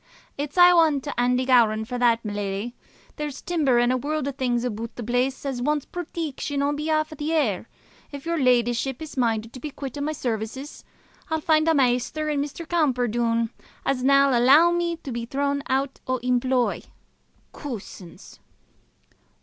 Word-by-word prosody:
"It's 290 +3 -5
ae 355 0 +9
ane 325 -5 +4
to 285 -3 -5
Andy 250 +1 +2
Gowran 225 -4 +4
for 245 +2 -4
that, 235 -2 +2
my 210 - -3
leddie. 205 +4 -3 0.4
There's 295 -2 -4
timber 300 -8 +1
and 240 +1 +3
a - - +1
warld 295 +2 -2
o' - - -1
things 245 -3 -1
aboot 230 -1 -4
the 240 - -6
place 250 +4 -1
as 265 -3 -3
wants 295 +2 0
proteection 305 -5 -4
on 290 - 0
behalf 310 +1 -1
o' - - -9
the 300 +2 -3
heir. 230 - 0 0.4
If 285 0 -8
your 335 -1 -1
leddieship 245 0 +2
is 315 -1 -8
minded 230 -3 0
to 255 - -8
be 300 - -5
quit 275 -1 -7
o' - - -3
my 305 +2 -1
sarvices, 245 +2 -4 0.5
I'll 320 0 0
find 310 0 +2
a 325 - +4
maister 270 +4 +1
in 285 -1 0
Mr. 295 +3 -6
Camperdoon, 240 -7 +1 0.3
as'll 260 -1 0
nae 275 -1 +5
alloo 290 +8 +6
me 345 -1 0
to 280 - -8
be 235 0 -4
thrown 280 +2 -1
out 270 +1 -1
o' 255 0 +1
employ. 250 0 +1 0.7
Coosins!" 215 - -9
265 Hz, 175 wpm, -24 LUFS, 240-300 Hz, 0.7 s, ae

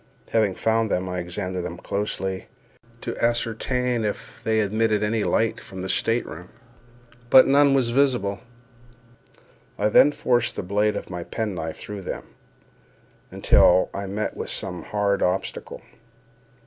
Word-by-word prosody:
Having 105 -4 +2
found 115 0 +1
them, 90 0 -1
I 90 0 -3
examined 90 +1 -4
them 90 0 -5
closely 95 -1 -3 0.5
to - - -4
ascertain 120 +1 0
if 105 +2 -5
they 110 -1 +1
emitted 110 0 +1
any 105 0 0
light 115 +1 +1
from 95 -1 -9
the 95 - -4
state 115 +5 +1
room; 90 +3 -9 0.8
but 130 - +8
none 140 0 +5
was 125 -3 +2
visible. 120 -7 +1 1.4
I 105 +1 +2
then 145 +6 +6
forced 125 -5 0
the - - -4
blade 105 +3 +1
of - - -7
my 90 -1 -4
pen 110 +2 -3
knife 80 -2 -5
through 105 -1 -7
them, 90 - -5 1.1
until 95 - +4
I 100 0 -4
met 105 +3 -3
with - - -5
some 90 -1 -4
hard 100 -1 0
obstacle. 90 - -2
105 Hz, 145 wpm, -24 LUFS, 95-115 Hz, 1.4 s, but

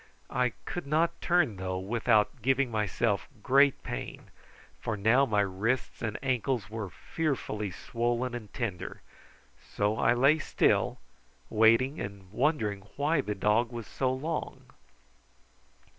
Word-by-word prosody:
I 125 -2 +1
could 175 -5 -5
not 165 +3 +1
turn, 160 - +2
though, 95 0 -3
without 110 +4 +1
giving 135 +1 +2
myself 105 0 0 0.2
great 140 +1 +4
pain, - - -6 0.5
for 115 -2 -3
now 115 +7 +4
my 105 -2 +2
wrists 100 +6 -1
and 110 -2 -2
ankles 125 -4 -1
were 110 -3 -4
fearfully 105 - -3
swollen 120 +6 -2
and 110 -4 -7
tender, 105 -8 -4 0.7
so 105 +2 0
I 115 +2 +4
lay 140 +6 +4
still, - - +2 0.5
waiting 115 +6 +4
and 100 -2 -7
wondering 110 -6 0
why 145 +1 +2
the 105 -5 -3
dog 110 +4 +2
was 120 -2 -6
so 130 +4 -1
long. 155 +5 -4
120 Hz, 130 wpm, -29 LUFS, 105-135 Hz, 0.7 s, great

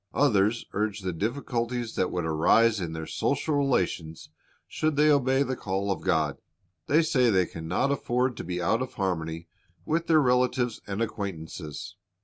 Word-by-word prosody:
"^ - - -56 0.2
Others 115 -4 +3
urge 105 0 -1
the 95 -1 -3
difficulties 120 - -2
that 90 - 0
would 90 -2 -2
arise 100 +7 +3
in 85 -2 -4
their 80 0 -5
social 140 - -1
relations 90 - -1 0.4
should 155 -1 -1
they 150 +1 +5
obey 135 -1 +3
the 130 -1 -2
call 100 -3 -2
of 95 - -2
God. - - 0 0.5
They 155 +3 +4
say 135 -7 +3
they 95 -4 +3
can 80 -1 -8
not 135 +11 +1
afford 125 -2 0
to - - -5
be 90 0 -3
out 100 +7 +1
of 130 - -5
harmony 85 -3 -2 0.4
with 165 +2 -1
their 160 -2 +5
relatives 125 -2 +1
and 100 +3 -1
acquaintances. 90 -3 -6
110 Hz, 170 wpm, -27 LUFS, 90-130 Hz, 0.5 s, they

